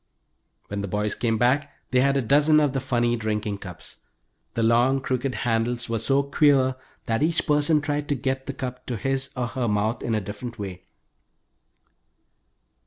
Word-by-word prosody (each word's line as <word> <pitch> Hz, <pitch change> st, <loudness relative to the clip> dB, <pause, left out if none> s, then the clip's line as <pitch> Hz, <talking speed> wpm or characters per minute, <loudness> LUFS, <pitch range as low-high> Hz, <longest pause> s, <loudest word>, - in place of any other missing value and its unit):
When 100 Hz, 0 st, -3 dB
the 100 Hz, -, -3 dB
boys 105 Hz, +2 st, -1 dB
came 115 Hz, -2 st, 0 dB
back 135 Hz, +6 st, +2 dB, 0.2 s
they 125 Hz, -, +4 dB
had 140 Hz, +1 st, +3 dB
a 135 Hz, -, 0 dB
dozen 150 Hz, +5 st, +5 dB
of 145 Hz, -3 st, +2 dB
the 135 Hz, -, 0 dB
funny 120 Hz, -2 st, +1 dB
drinking 105 Hz, -2 st, -2 dB
cups. 90 Hz, -4 st, -10 dB, 0.6 s
The 115 Hz, -, +1 dB
long 120 Hz, +4 st, +3 dB
crooked 130 Hz, 0 st, -2 dB
handles 120 Hz, +1 st, 0 dB
were 115 Hz, -1 st, 0 dB
so 135 Hz, +5 st, +2 dB
queer 140 Hz, -2 st, +3 dB, 0.3 s
that 115 Hz, -1 st, 0 dB
each 160 Hz, +1 st, +1 dB
person 150 Hz, +1 st, +3 dB
tried 145 Hz, 0 st, -2 dB
to 145 Hz, -, +2 dB
get 130 Hz, +1 st, -2 dB
the -, -, -3 dB
cup 125 Hz, -1 st, -6 dB
to 120 Hz, -, -2 dB
his 135 Hz, +4 st, -1 dB
or 125 Hz, -, 0 dB
her 125 Hz, 0 st, -2 dB
mouth 105 Hz, +2 st, 0 dB
in 115 Hz, -, -1 dB
a -, -, +1 dB
different 105 Hz, +5 st, -7 dB
way. 95 Hz, -4 st, -7 dB
125 Hz, 175 wpm, -25 LUFS, 115-140 Hz, 0.6 s, dozen